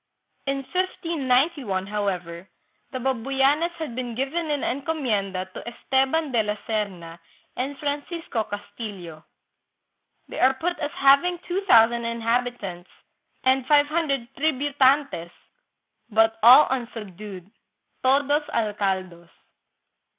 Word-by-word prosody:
In 275 Hz, 0 st, -1 dB
1591, 280 Hz, -, 0 dB
however, 190 Hz, -4 st, -4 dB, 0.4 s
the 260 Hz, -, -4 dB
Babuyanes 270 Hz, +5 st, +1 dB
had 315 Hz, -7 st, -5 dB
been 245 Hz, -2 st, -4 dB
given 300 Hz, +6 st, -2 dB
in 290 Hz, -2 st, -1 dB
encomienda 230 Hz, -, -2 dB
to -, -, -7 dB
Esteban 270 Hz, +5 st, 0 dB
de 235 Hz, -3 st, +3 dB
la 210 Hz, -1 st, -2 dB
Serna 185 Hz, -7 st, -3 dB, 0.4 s
and 270 Hz, +3 st, -3 dB
Francisco 290 Hz, -4 st, -3 dB
Castillo. 200 Hz, -6 st, -8 dB, 1.0 s
They -, -, -7 dB
are 260 Hz, +1 st, +4 dB
put 350 Hz, +6 st, -2 dB
as 295 Hz, -2 st, -2 dB
having 280 Hz, +6 st, +5 dB
two 370 Hz, +3 st, -1 dB
thou 225 Hz, -7 st, +8 dB
sand 235 Hz, 0 st, -4 dB
inhabitants 230 Hz, -5 st, -2 dB, 0.5 s
and 260 Hz, 0 st, +2 dB
five 290 Hz, -1 st, +5 dB
hundred 290 Hz, -6 st, -1 dB
" -, -, -41 dB
tributantes," 280 Hz, -, +2 dB, 0.8 s
but 225 Hz, 0 st, +3 dB
all 250 Hz, +6 st, +9 dB
unsubdued 210 Hz, -6 st, -6 dB, 0.5 s
("todos 285 Hz, +3 st, +3 dB
algados"). 190 Hz, -6 st, -2 dB
255 Hz, 110 wpm, -24 LUFS, 210-285 Hz, 1.0 s, all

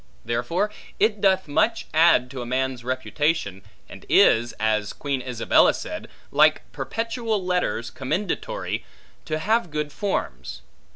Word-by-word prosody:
Therefore 120 Hz, -, -1 dB, 0.3 s
it 215 Hz, -2 st, +2 dB
doth 190 Hz, -2 st, +3 dB
much 220 Hz, +10 st, +1 dB
add 160 Hz, -6 st, +4 dB
to 130 Hz, -, -6 dB
a -, -, -5 dB
man's 130 Hz, -1 st, -1 dB
reputation, 130 Hz, -, -1 dB, 0.3 s
and -, -, -12 dB
is 120 Hz, +2 st, +5 dB
(as 110 Hz, -1 st, 0 dB
Queen 140 Hz, -3 st, -3 dB
Isabella 125 Hz, -2 st, +3 dB
said) -, -, -6 dB, 0.2 s
like -, -, +4 dB
perpetual 225 Hz, -3 st, -2 dB
letters 180 Hz, -10 st, -1 dB
commendatory, 205 Hz, -, -3 dB, 0.4 s
to 155 Hz, -, -2 dB
have 215 Hz, +3 st, +1 dB
good 150 Hz, -1 st, -3 dB
forms. 65 Hz, -, -3 dB
150 Hz, 125 wpm, -24 LUFS, 120-195 Hz, 0.4 s, is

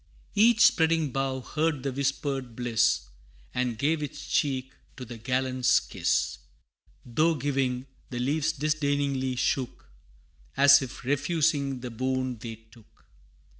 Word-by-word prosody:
Each 220 Hz, +2 st, +4 dB
spreading 160 Hz, -8 st, +4 dB
bough 135 Hz, 0 st, -2 dB
heard 155 Hz, 0 st, -1 dB
the 135 Hz, -, -1 dB
whispered 135 Hz, -2 st, -2 dB
bliss, 115 Hz, -, +2 dB, 0.5 s
And 125 Hz, -2 st, -1 dB
gave 150 Hz, +5 st, +1 dB
its 145 Hz, -, -6 dB
cheek 130 Hz, -2 st, 0 dB, 0.3 s
to 125 Hz, -, -7 dB
the 115 Hz, -1 st, -9 dB
gallant's 130 Hz, +1 st, +2 dB
kiss -, -, -1 dB, 0.7 s
Though 155 Hz, +8 st, +2 dB
giving, 135 Hz, -2 st, -1 dB, 0.2 s
the 125 Hz, -, -5 dB
leaves 145 Hz, +5 st, 0 dB
disdainingly 140 Hz, -3 st, -1 dB
shook, 125 Hz, -, -2 dB, 0.7 s
As 140 Hz, 0 st, +7 dB
if 130 Hz, -2 st, -8 dB
refusing 145 Hz, -2 st, 0 dB
the 125 Hz, -1 st, -6 dB
boon 130 Hz, 0 st, -2 dB
they 115 Hz, 0 st, -6 dB
took. 110 Hz, 0 st, -22 dB
135 Hz, 125 wpm, -27 LUFS, 125-145 Hz, 0.7 s, As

